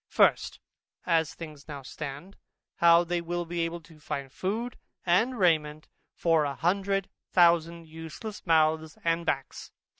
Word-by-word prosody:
First, - - +3 0.5
As 165 -3 +1
things 155 -4 -10
now 145 -3 -7
stand, 150 +7 -7 0.4
how 170 0 +6
they 175 0 -1
will 175 +1 -3
be 170 +1 -4
able 165 +1 -2
to 160 -1 -18
find 140 -3 -5
food 225 - -3 0.3
and 220 +9 +2
raiment 155 -5 +1 0.3
for 165 -2 +3
a 140 -1 -2
hundred 195 +4 0 0.3
thousand 170 -1 +3
useless 165 +7 -8
mouths 160 -1 +2
and 165 0 0
backs. 135 -4 -3
165 Hz, 140 wpm, -28 LUFS, 155-175 Hz, 0.5 s, how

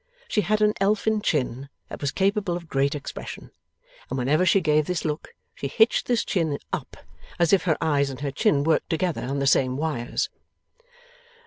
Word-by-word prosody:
She 210 - +1
had 215 +4 +1
an 210 0 +4
elfin 215 +2 +2
chin 135 - -1 0.2
that - - -8
was 140 - 0
capable 195 -2 0
of 170 -2 -11
great 140 0 +1
expression; 145 - -7 0.6
and 130 - -3
whenever 150 +8 +2
she 195 - +5
gave 155 -3 +2
this 180 -2 -2
look, 150 -1 -4 0.2
she 140 - -4
hitched 220 - +3
this 240 -3 +1
chin 160 -6 0 0.2
up. - - -4 0.4
As 170 +1 +3
if 190 - +4
her 160 -4 +2
eyes 145 -3 +2
and 135 0 -8
her 140 -1 -2
chin 140 +1 +2
worked 160 +1 +1
together 170 0 -1
on 135 +3 -3
the 140 - 0
same 130 -1 +3
wires. 145 -6 -2
155 Hz, 185 wpm, -25 LUFS, 140-185 Hz, 0.6 s, she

